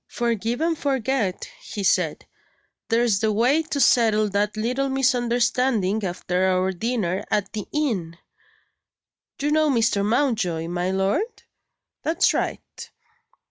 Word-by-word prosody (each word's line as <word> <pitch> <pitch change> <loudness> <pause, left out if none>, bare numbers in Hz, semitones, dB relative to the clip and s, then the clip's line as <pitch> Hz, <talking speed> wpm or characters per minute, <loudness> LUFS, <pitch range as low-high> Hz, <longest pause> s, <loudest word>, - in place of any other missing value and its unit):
"Forgive 235 +2 -2
and 330 0 +1
forget," 265 - -1
he 205 - -6
said, - - +1 0.6
"there's 230 -3 +2
the 220 0 +1
way 245 +9 +3
to 310 -3 -4
settle 220 -4 +4
that 205 +2 -1
little 250 +5 -1
misunderstanding, 240 -4 +1
after 180 0 -1
our 185 0 +1
dinner 200 -2 -2
at 205 - -1
the 210 -3 -5
inn. 205 - -2 1.2
You 290 +2 0
know 310 0 +3
Mr. 225 -6 +2
Mountjoy, 210 - 0
my 175 +1 -1
lord? 195 - -1 0.6
That's 325 +2 +2
right. - - -4
225 Hz, 120 wpm, -23 LUFS, 195-265 Hz, 1.2 s, settle